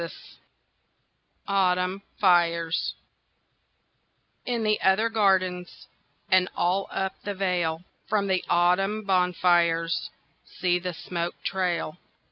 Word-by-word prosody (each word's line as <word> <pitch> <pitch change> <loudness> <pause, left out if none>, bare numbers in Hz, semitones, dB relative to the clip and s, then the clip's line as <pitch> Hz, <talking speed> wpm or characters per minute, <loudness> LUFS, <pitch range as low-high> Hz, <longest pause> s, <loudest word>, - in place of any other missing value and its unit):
VI 170 - -4 1.4
Autumn 185 -1 +1 0.2
Fires 170 -3 +2 1.5
In 240 -2 -1
the 215 -1 +1
other 190 +4 +3
gardens 185 -5 0 0.5
And 185 0 +4
all 185 +3 0
up 190 0 -2
the 205 -1 -4
vale, 175 -4 -1 0.3
From 210 -2 +1
the 190 -2 0
autumn 185 +5 +2
bonfires 175 -3 +2 0.3
See 180 -1 -1
the 180 -1 -5
smoke 170 0 -4
trail! 180 -3 -2
180 Hz, 95 wpm, -26 LUFS, 175-195 Hz, 1.5 s, And